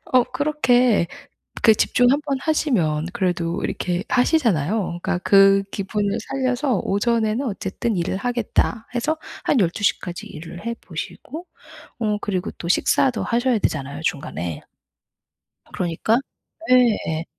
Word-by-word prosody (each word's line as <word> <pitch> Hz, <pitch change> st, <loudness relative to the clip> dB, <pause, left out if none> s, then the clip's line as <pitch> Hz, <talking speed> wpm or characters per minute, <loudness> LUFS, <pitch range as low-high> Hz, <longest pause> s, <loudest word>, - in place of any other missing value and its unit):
어 255 Hz, -1 st, +5 dB
그렇게 255 Hz, -, +2 dB, 0.6 s
그 220 Hz, -, +8 dB
집중 245 Hz, +3 st, +3 dB
한번 285 Hz, -1 st, 0 dB
하시면 175 Hz, -, +1 dB
그래도 175 Hz, -2 st, -1 dB
이렇게 180 Hz, +1 st, -2 dB
하시잖아요. 215 Hz, -, +1 dB
그러니까 175 Hz, -, -1 dB
그 195 Hz, +1 st, +5 dB
기분을 200 Hz, +1 st, -2 dB
살려서 255 Hz, -4 st, 0 dB
'오전에는 225 Hz, +4 st, 0 dB
어쨌든 200 Hz, -1 st, -2 dB
일을 175 Hz, +2 st, -1 dB
하겠다.' 235 Hz, 0 st, -1 dB
해서 305 Hz, +6 st, 0 dB, 0.3 s
한 260 Hz, -, +2 dB
12 185 Hz, +3 st, 0 dB
시까지 175 Hz, -3 st, -1 dB
일을 170 Hz, +5 st, -10 dB
해 235 Hz, -, -2 dB
보시고 260 Hz, -, -7 dB, 0.5 s
어 210 Hz, -2 st, 0 dB
그리고 185 Hz, -3 st, -2 dB
또 170 Hz, -, -6 dB
식사도 240 Hz, +6 st, +2 dB
하셔야 240 Hz, +1 st, +1 dB
되잖아요, 140 Hz, -2 st, -2 dB
중간에. 85 Hz, -, -3 dB, 1.1 s
그러니까 180 Hz, +6 st, 0 dB, 0.5 s
예 -, -, +8 dB, 0.4 s
예. 160 Hz, +1 st, -3 dB
210 Hz, 285 characters per minute, -22 LUFS, 175-245 Hz, 1.1 s, 그